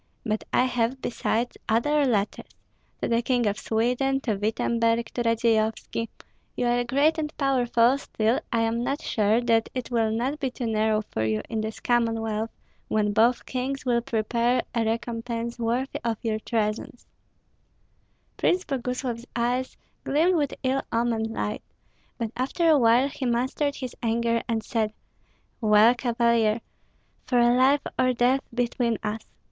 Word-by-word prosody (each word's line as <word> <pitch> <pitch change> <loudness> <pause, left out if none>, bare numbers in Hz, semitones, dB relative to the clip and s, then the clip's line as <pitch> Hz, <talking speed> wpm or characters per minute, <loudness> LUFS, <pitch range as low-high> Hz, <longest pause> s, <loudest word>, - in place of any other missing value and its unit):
But 215 -1 -1
I - - +4
have, 250 0 0
besides, 240 -1 -2
other 285 +6 +2
letters, 210 -4 -1 0.5
to - - +2
the 230 0 +2
King 245 -1 +1
of 205 0 0
Sweden, 250 +4 0
to 225 - 0
Wittemberg, 230 +2 0
to 245 - -2
Radzeyovski. 230 -1 0 0.5
You - - 0
are 240 0 +2
great 285 +6 +2
and 300 -1 -2
powerful; 255 -2 +3
still 225 -3 0
I 230 - +2
am 225 +1 0
not 275 +4 -2
sure 215 +1 +2
that 225 -2 +2
it 255 -1 -4
will 225 -2 +2
not 250 +7 -1
be 270 -2 -1
too 250 0 -5
narrow 215 -1 +1
for 110 - -1
you 110 -1 0
in 220 -2 -1
this 220 0 -5
Commonwealth, 225 -2 0 0.4
when 210 -1 +1
both 235 +4 +3
kings 265 +1 -3
will 240 -1 +2
prepare 235 0 0
a 230 -1 +1
recompense 230 +1 -3
worthy 240 +3 -1
of 230 -2 -1
your 220 -2 -1
treasons." 220 +1 -2 1.3
Prince 365 +1 +1
Boguslav's 250 -2 -3
eyes 245 +2 -1 0.3
gleamed 325 +6 +2
with 290 -4 +1
ill 265 +1 +1
omened 230 -1 0
light, 215 -1 -3 0.6
but 230 -3 -3
after 275 +7 0
a 310 -3 +6
while 240 +3 +4
he 280 -2 -4
mastered 260 +4 0
his 255 -2 -6
anger 230 0 +1
and 225 -2 -1
said, 215 -1 -1 0.7
"Well, 215 +2 +6
Cavalier! 235 -2 +1 0.7
For 245 - +3 0.2
life 270 +3 +4 0.2
or 255 0 +3
death 250 +3 +2
between 240 -1 0
us! 215 +1 -2
235 Hz, 150 wpm, -26 LUFS, 225-255 Hz, 1.3 s, a